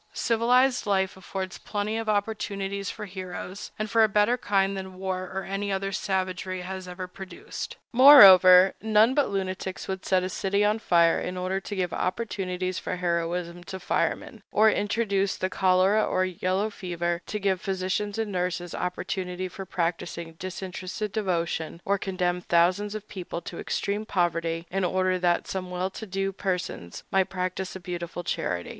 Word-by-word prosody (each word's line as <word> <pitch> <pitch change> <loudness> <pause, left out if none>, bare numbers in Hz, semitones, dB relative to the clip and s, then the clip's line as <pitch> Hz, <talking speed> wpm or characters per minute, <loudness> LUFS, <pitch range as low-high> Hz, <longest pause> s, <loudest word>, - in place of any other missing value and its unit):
Civilized 245 +2 +2
life 190 -2 +1
affords 190 0 -6
plenty 210 +1 -3
of 225 -1 -2
opportunities 200 -2 -2
for 210 - -6
heroes, 185 0 -7
and 215 - -2
for 225 +1 +4
a 220 - +4
better 210 +4 +3
kind 195 -4 +1
than 190 -1 -6
war 185 -1 -3
or 190 0 -3
any 200 +1 -3
other 195 0 -1
savagery 185 -1 -2
has 185 0 -6
ever 180 +1 -6
produced. 190 +1 -8 0.2
Moreover, 190 -8 +9
none 220 +3 +4
but 285 0 +2
lunatics 190 -1 -3
would 190 -1 -4
set 185 -1 +2
a 185 - -2
city 200 +2 0
on 210 +2 +2
fire 170 -5 +4
in 180 +1 -4
order 185 +1 -1
to 205 +1 -6
give 180 -3 -1
opportunities 185 -2 -2
for - - -3
heroism 175 0 -2
to 190 -1 -6
firemen, 215 +4 -2
or 215 +1 +5
introduce 200 -2 0
the 185 0 -2
cholera 185 +3 +3
or 185 0 +1
yellow 185 +3 -1
fever 175 -2 -3
to 210 - -3
give 190 -2 0
physicians 195 +2 -2
and 220 -2 -2
nurses 180 -1 -2
opportunity 180 0 -3
for 190 +1 -8
practicing 170 -1 -3
disinterested 185 +2 -5
devotion, 170 -5 -2
or 200 0 +1
condemn 180 -2 -1
thousands 180 +5 +2
of 215 0 -7
people 180 -3 -6
to - - -8
extreme 205 +2 -2
poverty 170 -3 0
in 195 +1 0
order 185 0 +1
that 175 -1 +1
some 185 -1 -4
well 180 +1 -2
to 220 - -8
do 195 +1 -1
persons 180 - -4
might 190 -1 +2
practice 185 0 -3
a - - -6
beautiful 175 -1 -5
charity. 90 - -2
190 Hz, 165 wpm, -26 LUFS, 180-200 Hz, 0.2 s, Moreover